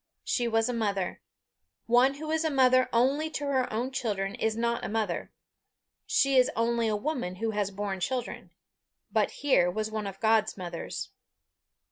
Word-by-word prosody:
She 240 -2 0
was 225 0 +2
a 250 - -1
mother. 200 -5 -2 0.6
One 250 +4 +4
who 310 +2 -5
is 320 0 +1
mother 255 -2 +4
only 275 +7 +2
to 295 -2 -4
her 265 -3 0
own 240 +4 -2
children 200 -6 -2
is 220 -1 -1
not 235 0 0
a - - -3
mother; 210 -5 -2 0.8
she 275 -1 +3
is 255 - +5
only 230 0 +1
a 215 - +1
woman 210 - -3
who 225 +4 -2
has 205 -2 -1
borne 200 -1 -4
children. 245 +6 -3 0.6
But - - +2
here 260 -11 +2
was 215 +4 -3
one 215 -2 -3
of 195 0 -8
God's 220 -1 +2
mothers. 175 -3 -5
230 Hz, 165 wpm, -28 LUFS, 205-255 Hz, 0.8 s, is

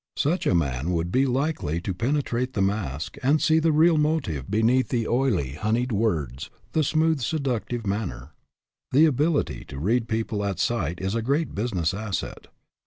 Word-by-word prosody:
Such 165 +6 +1
a - - +3
man 70 -2 0
would 85 +1 -1
be 135 +4 +3
likely 130 - -1
to 95 +1 -3
penetrate 125 +3 -1
the 100 - 0
mask 95 -8 -2
and 145 +4 +3
see 160 +1 +3
the 160 0 +2
real 160 +1 +4
motive 150 - -1
beneath 115 +5 +2
the 115 -3 0
oily, 115 - +1
honeyed 115 - -1
words, 80 - -1 0.2
the 160 - +2
smooth 155 0 +2
seductive 120 -4 -2
manner. 90 - -3 0.6
The 150 +5 +7
ability 150 +1 +1
to 70 - -9
read 115 - +1
people 110 -2 -2
at 100 -3 -2
sight 85 -4 -1
is 95 +1 -2
a 115 - 0
great 140 +7 0
business 95 -6 -1
asset. 100 -1 -4
115 Hz, 170 wpm, -25 LUFS, 90-140 Hz, 0.6 s, The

